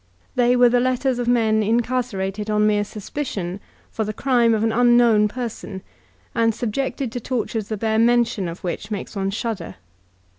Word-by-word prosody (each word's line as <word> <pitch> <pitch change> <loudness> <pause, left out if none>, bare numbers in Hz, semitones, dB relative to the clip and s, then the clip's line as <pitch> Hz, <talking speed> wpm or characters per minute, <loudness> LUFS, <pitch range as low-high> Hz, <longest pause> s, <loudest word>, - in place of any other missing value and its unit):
They 245 0 +3
were 245 0 +6
the 245 +1 +3
letters 255 0 0
of 240 - -2
men 220 -3 +3
incarcerated 220 -3 -1
on 210 0 +2
mere 210 -1 +2
suspicion 205 -4 -5 0.3
for 220 - -2
the 215 0 -4
crime 240 -3 +3
of 215 - -1
an 225 - +2
unknown 240 -2 +4
person, 210 -4 -6 0.5
and 230 -2 +2
subjected 260 +2 -2
to 245 - -4
tortures 225 -3 -3
the 215 - -3
bare 220 +1 0
mention 235 -4 +2
of 170 +1 -8
which 175 +3 -4
makes 210 0 -5
one 195 -1 -1
shudder. 210 -3 -4
225 Hz, 170 wpm, -22 LUFS, 210-245 Hz, 0.5 s, were